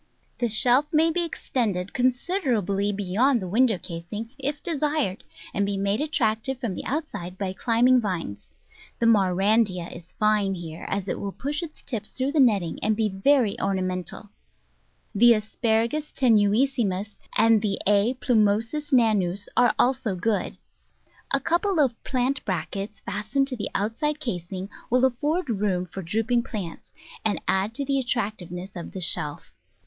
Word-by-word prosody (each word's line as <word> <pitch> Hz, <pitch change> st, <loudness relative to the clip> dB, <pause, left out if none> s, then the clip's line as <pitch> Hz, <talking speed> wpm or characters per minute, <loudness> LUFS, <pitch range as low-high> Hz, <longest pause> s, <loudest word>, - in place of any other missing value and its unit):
The 240 Hz, -, +1 dB
shelf 245 Hz, +6 st, +5 dB
may 325 Hz, +1 st, +4 dB
ex* 340 Hz, -2 st, -2 dB
tend 230 Hz, -7 st, +1 dB, 0.2 s
considerably 245 Hz, -, 0 dB
beyond 205 Hz, +7 st, +1 dB
the 185 Hz, -, -5 dB
window 225 Hz, +2 st, +3 dB
casing 180 Hz, +8 st, -7 dB
if 285 Hz, +2 st, -3 dB
de 335 Hz, -, -1 dB
sired, 295 Hz, -10 st, 0 dB, 0.3 s
and 200 Hz, -, +1 dB
be 200 Hz, 0 st, -1 dB
made 200 Hz, +5 st, 0 dB
attractive 265 Hz, -4 st, 0 dB
from 235 Hz, -7 st, -2 dB
the -, -, -6 dB
outside 255 Hz, -, -4 dB
by 190 Hz, -1 st, -3 dB
climbing 245 Hz, +4 st, +3 dB
vines. 165 Hz, -, -4 dB, 0.5 s
The 235 Hz, -, 0 dB
Maurandya 195 Hz, -2 st, +2 dB
is 175 Hz, +1 st, -13 dB
fine 210 Hz, -2 st, +1 dB
here, 165 Hz, -2 st, -8 dB
as 200 Hz, -1 st, -2 dB
it -, -, -2 dB
will 200 Hz, -, -4 dB
push 290 Hz, -, -3 dB
its 325 Hz, -3 st, -9 dB
tips 220 Hz, -4 st, -5 dB
through 265 Hz, +2 st, -1 dB
the 305 Hz, -, +1 dB
netting, 205 Hz, -10 st, +3 dB
and 215 Hz, +1 st, +2 dB
be 220 Hz, 0 st, +1 dB
very 220 Hz, +3 st, +2 dB
orna 190 Hz, -1 st, 0 dB
mental; 185 Hz, +2 st, -5 dB, 0.8 s
the 235 Hz, +3 st, +7 dB
Asparagus 225 Hz, +6 st, -1 dB
tenuissimus 215 Hz, -3 st, +2 dB, 0.2 s
and 225 Hz, -1 st, +5 dB, 0.2 s
A. 205 Hz, +5 st, +3 dB
plumosus 230 Hz, +5 st, +1 dB
nanus 205 Hz, -7 st, +2 dB
are 245 Hz, -, +4 dB
also 250 Hz, -5 st, +1 dB
good. 200 Hz, +2 st, -1 dB, 0.7 s
A 275 Hz, -, +2 dB
couple 345 Hz, +5 st, +1 dB
of 255 Hz, -6 st, +1 dB
plant 260 Hz, +1 st, 0 dB
brackets 195 Hz, +3 st, -4 dB
fastened 215 Hz, +7 st, -1 dB
to 255 Hz, -, -3 dB
the 215 Hz, -, -4 dB
outside 290 Hz, +9 st, -1 dB
casing 185 Hz, -, -4 dB, 0.2 s
will 250 Hz, +2 st, +4 dB
afford 295 Hz, +7 st, 0 dB
room 195 Hz, -5 st, 0 dB
for 185 Hz, +2 st, -7 dB
drooping 225 Hz, +7 st, 0 dB
plants, 200 Hz, -8 st, -7 dB, 0.3 s
and 215 Hz, -2 st, 0 dB
add 195 Hz, +4 st, +1 dB
to 280 Hz, -, -2 dB
the 275 Hz, 0 st, +1 dB
attractiveness 200 Hz, -6 st, -3 dB
of 175 Hz, -, -7 dB
the 190 Hz, -, -5 dB
shelf. 150 Hz, -4 st, -2 dB
220 Hz, 155 wpm, -25 LUFS, 195-260 Hz, 0.8 s, the